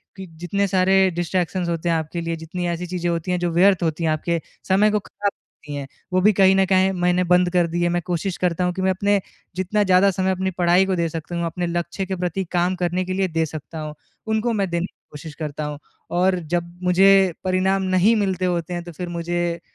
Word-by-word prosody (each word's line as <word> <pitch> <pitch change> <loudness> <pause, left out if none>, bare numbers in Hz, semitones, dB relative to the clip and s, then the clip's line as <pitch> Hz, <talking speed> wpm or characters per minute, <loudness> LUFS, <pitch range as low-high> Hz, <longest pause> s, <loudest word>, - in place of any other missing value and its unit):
कि 190 - -8
जितने 200 +3 0
सारे 190 0 +3
डिस्ट्रैक्शंस 175 +1 -1
होते 170 0 -1
हैं। 165 - +2
आपके 160 +2 -3
लिए, 165 0 -2
जितनी 175 +2 -5
ऐसी 170 +1 -2
चीज़ें 175 -1 -2
होती 170 +1 -2
हैं 180 - 0
जो 175 0 0
व्यर्थ 180 +2 +4
होती 165 0 -1
हैं, 160 - +2
आपके 165 +1 -1 0.3
समय 205 +3 +4
को 210 - +1
ख़राब 200 0 -3
करती 150 -1 -14
हैं। 140 -1 -5 0.3
वो 185 - +3
भी 210 +2 +5
कहीं 190 0 +5
न 195 0 +4
कहीं 190 0 +3
मैंने 180 +1 +2
बंद 180 0 +5
कर 175 -1 +3
दिए 175 +1 0
मैं 175 0 0
कोशिश 175 +1 -2
करता 180 -1 0
हूँ 180 0 0
कि 190 - -4
मैं 190 0 +2
अपने 200 +2 +1 0.4
जितना 190 +3 0
ज़्यादा 190 +1 +4
समय 190 +1 0
अपनी 190 0 -1
पढ़ाई 180 +1 +4
को 190 - 0
दे 170 -1 0
सकता 165 +2 -6
हूँ, 170 - -1
अपने 175 +1 -2
लक्ष्य 175 +3 -3
के 190 0 -3
प्रति 180 +1 -2
काम 180 +1 +1
करने 180 +1 -1
के 185 - -3
लिए 190 0 +1
दे 165 -2 0
सकता 155 +1 -8
हूँ। 155 -1 -5 0.3
उनको 220 +2 0
मैं 195 -3 0
देने 170 +1 -1
की - - -14
कोशिश 150 +1 -9
करता 150 -1 -4
हूँ 150 -1 -5 0.4
और 185 0 +3 0.2
जब 170 0 -4
मुझे 190 +1 +5
परिणाम 190 +1 +1
नहीं 205 +5 +4
मिलते 190 -3 0
होते 175 -1 -1
हैं। 175 - -4
तो 175 - -9
फिर 175 +2 -6
मुझे 170 0 -2
180 Hz, 235 wpm, -22 LUFS, 170-190 Hz, 0.4 s, भी